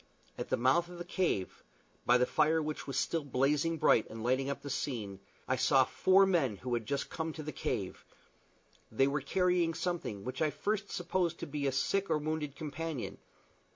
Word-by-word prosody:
At - - -5
the - - +1
mouth 135 +8 +3
of 180 - -9
the 175 - -6
cave 175 - -1 0.4
by 125 - +6
the 125 - +3
fire 155 +4 +3
which 155 -1 -4
was 135 - -3
still 165 -2 0
blazing 145 +5 +1
bright, 115 - +4
and 110 0 -7
lighting 130 +3 +1
up 140 - -4
the 140 - -5
scene 105 -10 -3 0.3
I - - +2
saw - - +5
four 190 +1 +4
men 155 - +1
who 125 +4 -4
had 115 -2 -1
just 140 0 -2
come 160 -1 -3
to 155 - -7
the 155 - -4
cave: 105 -8 -3 0.9
they 125 +5 +3
were 140 +1 0
carrying 180 +2 +1
something 165 - -3
which 130 +6 -5
I 155 - +4
at 150 - -5
first 205 -1 -1
supposed 175 -1 -1
to - - -2
be 145 -1 -2
a - - +2
sick 195 +9 0
or 160 - +3
wounded 150 -1 -3
companion. 155 -3 -5
150 Hz, 200 wpm, -32 LUFS, 130-170 Hz, 0.9 s, by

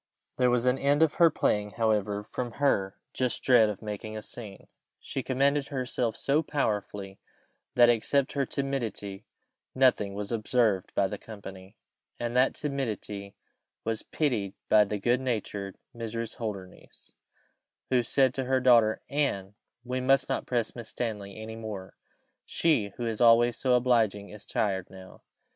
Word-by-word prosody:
There 125 -1 +4
was 120 0 +2
an 125 +1 +2
end 145 +3 +3
of 160 - +2
her 170 - +8
playing; 105 -8 0
however, 105 -2 +1
from 120 +2 -5
her 100 -9 +1 0.2
just 125 -1 -1
dread 120 -4 +6
of 105 +1 -6
making 110 +1 -5
a 105 - -7
scene, 105 -5 -6 0.3
she 135 - -4
commanded 140 +2 +1
herself 125 -4 -2
so 145 +3 +2
powerfully, 105 -9 -3 0.6
that, 120 -1 +7
except 125 +4 +2
her 140 -2 -1
timidity, 115 -8 -3 0.5
nothing 125 -7 +3
was 105 +1 -4
observed 110 -3 +1
by 100 - +3
the 105 +1 -6
company, 95 -2 -10 0.4
and 120 0 -3
that 130 +1 +3
timidity 110 -8 -4 0.5
was 115 -1 -2
pitied 115 -11 -1
by 105 -1 +6
the 105 +1 -3
good 120 +5 +1
natured 105 -6 -3 0.2
Mrs. 115 0 -4
Holdernesse, 100 -5 -8 0.8
who 125 -1 +4
said 130 +2 +2
to 135 0 -2
her 130 +1 +2
daughter, 120 -4 +4
"Anne, 120 -10 -1 0.3
we 130 +1 -3
must 135 +2 +3
not 135 - -2
press 120 -3 -1
Miss 115 -3 -8
Stanley 105 -4 -4
any 110 +1 -7
more; 105 -4 -7 0.5
she, 150 -11 +1
who 120 - -3
is 115 -1 -2
always 120 0 +6
so 130 -2 +2
obliging, 115 -5 +2
is 105 -1 -10
tired 95 -3 -1
now." 95 -1 -13
115 Hz, 155 wpm, -28 LUFS, 105-130 Hz, 0.8 s, her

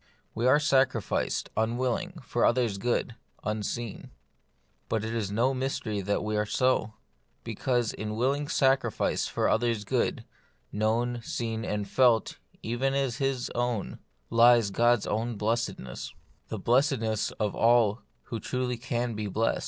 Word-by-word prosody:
We 115 +3 0
are 145 +3 +6
sacrificed, 135 -6 +1
unwilling, 130 +11 -1
for 120 - -1
others' 115 -5 +2
good, 120 +1 0 0.3
un 110 0 -2
seen: 115 +1 -5 0.8
but 110 -1 0
it 110 - -3
is 110 -4 -1
no 120 +6 +1
mystery 125 -5 -2
that 100 +2 -1
we 105 0 -2
are 105 - +1
so; 110 -3 +1 0.5
because 120 -3 -1
in 110 0 -4
willing 140 +5 0
sacrifice 135 -6 +1
for - - 0
others' 115 -2 +1
good, - - 0 0.5
known, 115 +3 0
seen, 115 -1 -3
and 105 -2 -2
felt 120 -5 +3 0.2
even 130 +4 0
as 135 -3 0
His 135 -2 -1
own, 120 -3 -2 0.3
lies 115 -2 +5
God's 120 +2 +3
own 115 +2 -1
blessedness; 105 - -3 0.3
the 110 - -4
blessedness 115 -1 +1
of 105 -1 -2
all 115 -1 +3 0.2
who 115 - -5
truly 125 +2 -2
can 120 -1 -2
be 105 -1 -3
blest. 110 +3 0
120 Hz, 140 wpm, -28 LUFS, 110-125 Hz, 0.8 s, are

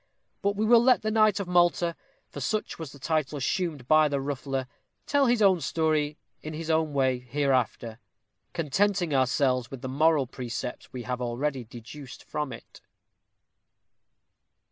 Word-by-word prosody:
But 200 0 +1
we 215 +2 0
will 235 +1 +6
let 255 -2 +4
the 215 - 0
knight 215 -2 +4
of 200 - -3
Malta, 175 -1 +2 0.3
for - - -9
such 215 -5 -2
was 160 -4 -6
the 145 - -13
title 155 0 -1
assumed 150 -2 -2
by 155 +1 +5
the 140 -1 -1
ruffler, 135 -1 -3 0.4
tell 285 -2 +3
his 240 -3 +3
own 190 -4 +4
story 155 0 0 0.2
in 155 0 -6
his 165 +1 -3
own 160 -1 +1
way 130 -2 +2
hereafter; 125 -3 -1 0.5
contenting 175 +1 0
ourselves 130 -2 +2
with 135 -3 -9
the - - -3
moral 150 +2 +3
precepts 125 -1 -6
we 125 -2 -6
have 125 0 -3
already 125 +2 -2
deduced 125 +3 -11
from 150 -3 -4
it. 120 - -12
150 Hz, 155 wpm, -27 LUFS, 130-175 Hz, 0.5 s, will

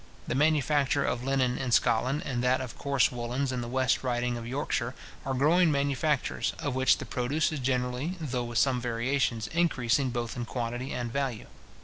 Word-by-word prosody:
The - - -1
manufacture 145 -1 +2
of 120 0 -1
linen 130 -2 +1
in 130 -2 -2
Scotland, 125 +5 +2
and 125 -2 -2
that 125 +1 +3
of 130 -3 -6
coarse 140 -2 +2
woollens 125 +2 -2
in 125 -1 -2
the 120 - -5
West 130 +2 +1
Riding 120 -1 0
of 115 -1 -6
Yorkshire, 130 -2 -2 0.3
are 135 - 0
growing 160 +5 +4
manufactures, 140 0 0
of 145 - -3
which 130 +1 +3
the - - -6
produce 140 +6 0
is 155 - -3
generally, 125 +5 -1
though 130 -6 -2
with 120 -1 -4
some 125 +1 +3
variations, 120 -1 0
increasing 140 -6 +1
both 120 -1 -3
in 120 -1 -3
quantity 120 +2 -4
and 120 -1 -3
value. 135 -5 -2
130 Hz, 180 wpm, -28 LUFS, 120-140 Hz, 0.3 s, growing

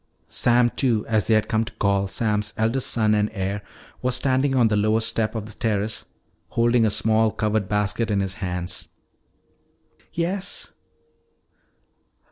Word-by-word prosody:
Sam 120 0 +3
Two, 115 -6 +1
as 110 -2 0
they 110 - +4
had 110 0 +2
come 110 -1 +1
to 115 - -7
call 100 -1 +1
Sam's 105 0 0
eldest 115 +4 +1
son 110 -2 +2
and 105 0 +2
heir, 100 0 -2 0.4
was 125 0 0
standing 135 0 +1
on 120 -3 +5
the 105 - +1
lowest 110 +2 +2
step 110 0 -1
of 110 -2 -3
the 110 - -9
terrace, 110 0 -2 0.4
holding 115 +2 +3
a - - +2
small 110 +1 +2
covered 105 -2 -1
basket 105 +2 0
in 105 -2 +1
his 95 -1 -2
hands. 90 -2 -4 1.2
"Yes?" 180 +3 -2
110 Hz, 150 wpm, -23 LUFS, 105-115 Hz, 1.2 s, on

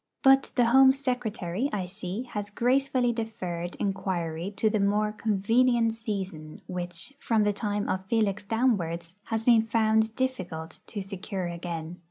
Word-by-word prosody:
But 270 0 +6
the 245 - +4
Home 265 +3 +7
Secretary, 245 -5 -2
I 195 -3 -2
see, 190 +4 -5
has 205 -1 -3
gracefully 250 +2 +2
deferred 185 -7 -4
enquiry 185 -3 -2
to 220 - +2
the 215 0 +2
more 210 +1 +2
convenient 225 +3 +2
season 195 -9 -5
which, 180 +6 -5
from 220 -2 +2
the 205 0 +2
time 205 0 -2
of 190 0 -2
Felix 215 -2 +1
downwards, 185 -7 0
has 225 -1 -2
been 235 -2 +6
found 220 0 +2
difficult 185 -12 -3
to 205 -3 -5
secure 195 -1 -5
again. 170 0 -5
210 Hz, 145 wpm, -28 LUFS, 180-230 Hz, -, Home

